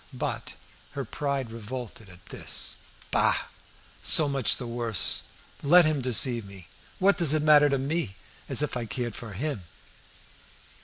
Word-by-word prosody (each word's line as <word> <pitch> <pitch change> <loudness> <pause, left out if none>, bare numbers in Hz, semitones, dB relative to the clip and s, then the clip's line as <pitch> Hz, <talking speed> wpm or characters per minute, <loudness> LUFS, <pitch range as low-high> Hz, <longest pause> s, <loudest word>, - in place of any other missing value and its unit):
But - - -4 0.4
her 140 -1 -4
pride 135 -1 -3
revolted 115 -2 -8
at 90 0 -16
this. - - -2 0.3
"Bah! - - +3 0.7
so 155 - +5
much 135 -3 +2
the 125 - -6
worse. 115 -5 0 0.4
Let 170 +4 +6
him 155 -3 0
deceive 125 -1 +3
me! 100 -3 -12 0.3
What 195 +2 +3
does 155 -3 +4
it 155 - 0
matter 150 -1 +6
to 140 - +1
me? 135 - -2 0.3
As - - +3
If 150 - -3
I 120 -2 -3
cared 120 +1 -4
for 115 -4 -8
him!" 130 +1 -4
130 Hz, 150 wpm, -27 LUFS, 115-150 Hz, 0.7 s, Let